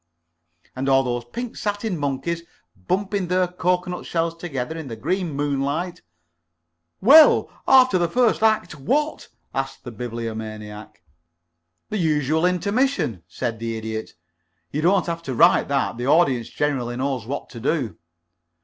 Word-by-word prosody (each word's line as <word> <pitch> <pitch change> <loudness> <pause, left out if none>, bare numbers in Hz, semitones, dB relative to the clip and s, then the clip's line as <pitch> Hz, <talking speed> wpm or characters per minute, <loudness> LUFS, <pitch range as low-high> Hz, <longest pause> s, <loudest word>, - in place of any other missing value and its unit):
"And 135 +1 -1
all 135 0 +5
those 120 -1 -2
pink 240 - -6
satin 205 -1 -2
monkeys 145 +3 -2 0.3
bumping 190 - -2
their 180 +1 +2
cocoanut 180 0 -1
shells 165 0 -1
together 160 -4 -4
in 160 -3 -6
the 115 - -6
green 175 - -2
moonlight 145 +4 -2 0.5
" 85 0 -53
"Well, 310 +2 +8 0.2
after 255 -7 +6
the 170 -1 +1
first 240 +2 +2
act, 220 -8 +1
what?" 295 - -1 0.3
asked 135 0 -4
the 120 - -7
Bibliomaniac. 110 -4 -6 0.9
"The 215 - -1
usual 155 0 +2
intermission," 200 - 0
said 115 +6 -4
the 115 0 -3
Idiot. 110 0 -5 0.6
"You 150 - -2
don't 180 +2 +3
have 170 -1 -3
to 135 -6 -5
write - - +5
that. 140 -4 0
The 120 +1 -3
audience 140 -7 +3
generally 130 -5 -1
knows 130 -4 -2
what 140 - -5
to 120 - -8
do." 120 - -1
145 Hz, 140 wpm, -23 LUFS, 120-180 Hz, 0.9 s, Well